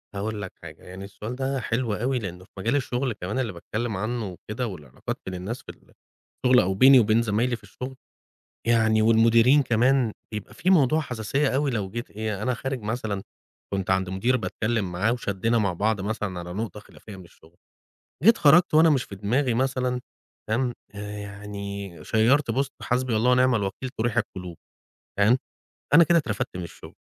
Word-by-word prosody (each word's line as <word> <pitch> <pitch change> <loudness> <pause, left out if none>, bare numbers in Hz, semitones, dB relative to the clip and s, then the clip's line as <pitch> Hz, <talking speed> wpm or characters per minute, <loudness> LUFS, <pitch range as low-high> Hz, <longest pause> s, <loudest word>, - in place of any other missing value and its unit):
هاقول 105 +1 -3
لك 95 - -7
حاجة 80 -2 -11
يعني 95 +2 -9
السؤال 105 +4 -7
ده 135 +1 -1
حلو 115 -1 -1
أوي 125 +4 0
لأنه 90 -4 -7
في - - -32
مجال 115 +8 0
الشغل 130 -2 -1
كمان 105 +4 -4
اللي 115 -6 -2
باتكلم 110 +5 -4
عنه 110 +3 -2
وكده 110 +7 -5
والعلاقات 75 - -7
بين 95 - -5
الناس 100 +7 -5
في - - -15
ال - - -23 0.5
الشغل 125 0 +6
أو 95 -2 +1
بيني 130 +6 +7
وبين 110 +1 +3
زمايلي 115 +2 0
في - - -15
الشغل، 130 +1 -8 0.7
يعني 110 -2 +3
والمديرين 115 +5 +5
كمان 120 0 +2 0.2
بيبقى 105 -2 -6
فيه 185 - 0
موضوع 155 -3 +4
حساسيّة 135 +1 -1
أوي 140 +2 +1
لو 105 -6 -2
جيت 120 +4 -6
إيه، 105 -1 -4
أنا 125 +1 0
خارج 135 +1 -4
مثلًا 105 -2 -3 0.5
كنت 95 -1 -2
عند 95 -1 +1
مدير 115 +7 +1
باتكلم 110 -5 -2
معاه 100 +6 +1
وشدّينا 115 0 0
مع 100 -4 +1
بعض 105 +4 0
مثلًا 100 -2 -3
على 90 0 -6
نقطة 105 0 -4
خلافيّة 105 0 -13
من 95 - -12
الشغل، 85 0 -21 0.7
جيت 225 +4 +7
خرجت 155 +4 +5
وأنا 160 +1 +6
مش 140 -5 +2
في 100 - -10
دماغي 120 +6 0
مثلًا 125 0 0 0.5
تمام؟ 120 +2 0 0.2
آآ 105 0 -6
يعني 100 -1 -6
شَيَّرت 120 +4 +3
post 135 +3 0
حسبي 125 -1 0
الله 120 +4 +3
ونعم 125 -1 +4
الوكيل 100 +5 -3
تُريْح 120 +1 0
القُلوب 90 -6 -3 0.6
تمام؟ 110 +5 +5 0.6
أنا 170 +2 +9
كده 170 0 +4
اترفدْت 110 - -3
من 90 - -4
الشغل. 85 - -11
110 Hz, 180 wpm, -25 LUFS, 100-125 Hz, 0.7 s, أنا